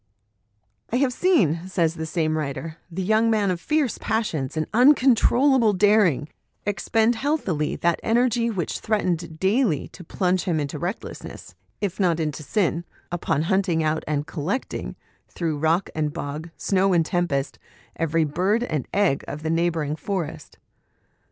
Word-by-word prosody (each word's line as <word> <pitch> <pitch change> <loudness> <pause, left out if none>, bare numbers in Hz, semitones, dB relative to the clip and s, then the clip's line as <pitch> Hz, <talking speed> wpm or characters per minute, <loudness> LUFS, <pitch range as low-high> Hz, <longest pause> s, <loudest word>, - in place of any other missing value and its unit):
" 105 0 -47
I - - 0
have 255 0 +2
seen," 185 - +2
says 170 -4 +1
the 160 -1 -5
same 155 -1 0
writer, 155 +2 -4
" - - -36
the 185 +3 -3
young 220 +4 +3
man 210 -4 +2
of 175 -1 -3
fierce 300 -6 0
passions 160 - -2
and 155 - 0
uncontrollable 255 -1 +5
daring 200 - +3 0.4
expend 220 +4 +1
healthily 220 - -1
that 170 -1 +1
energy 235 0 +2
which 190 -7 -3
threat 215 -1 0
ened 170 -2 -2
daily 190 - +1
to 180 - -12
plunge 180 +1 0
him 170 -5 0
into 145 -1 -3
recklessness, 85 - -6 0.3
if 195 -2 -2
not 175 -4 +2
into 150 -3 -2
sin, 170 0 0 0.3
upon 165 -3 0
hunting 180 -2 +1
out 155 0 0
and 145 -1 -1
collecting, 165 - -4 0.3
through 160 -4 -3
rock 165 +4 +1
and 150 -2 -1
bog, 150 +4 -5
snow 195 -1 +2
and 165 -2 +3
tempest, 140 - -1 0.4
every 165 0 +1
bird 185 +10 +1
and 155 - -3
egg 195 -8 +2
of 150 +2 -6
the 160 - -1
neighbouring 165 -3 0
forest. 160 -4 -5
175 Hz, 155 wpm, -24 LUFS, 155-210 Hz, 0.4 s, uncontrollable